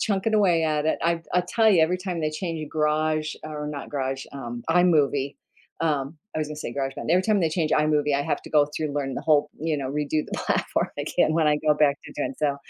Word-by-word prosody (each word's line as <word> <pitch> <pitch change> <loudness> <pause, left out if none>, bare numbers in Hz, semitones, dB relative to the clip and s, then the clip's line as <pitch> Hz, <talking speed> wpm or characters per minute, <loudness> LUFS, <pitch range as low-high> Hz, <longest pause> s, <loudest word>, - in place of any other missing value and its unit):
chunking 205 +1 0
away 180 -6 +3
at 150 -1 0
it. 160 - +1
I 170 0 +1
I'll 180 0 +3
tell 220 +4 +3
you, 175 -6 +5
every 180 +3 +1
time 180 -3 -4
they 155 -1 0
change 165 0 -4
a 155 - -5
garage, 155 0 0
or 150 -1 -5
not 145 -2 -6
garage, 135 -1 -2
um, 120 -4 -6
iMovie, 145 -6 +3 0.5
um- 150 -1 -1 0.2
I - - 0
was 155 -1 -2
gonna 150 - -6
say 150 - -5
GarageBand- 135 +2 -3
every 180 +2 +4
time 210 -1 +2
they 165 - +2
change 155 -1 0
iMovie, 150 -1 +2
I 140 - +1
have - - -2
to - - -11
go 150 -2 +4
through 150 +1 -3
and 145 - -5
learn 135 -2 -2
the - - -4
whole, 150 -2 +3
you 160 -1 0
know, 135 -2 -3
redo 150 +1 -1
the - - -13
platform - - 0
again 155 - +1
when 160 -2 +2
I 150 - +3
go 150 0 +2
back 145 -1 +3
to - - -10
doing, 135 -2 -2
so, 145 -2 +1
155 Hz, 245 wpm, -25 LUFS, 145-165 Hz, 0.5 s, you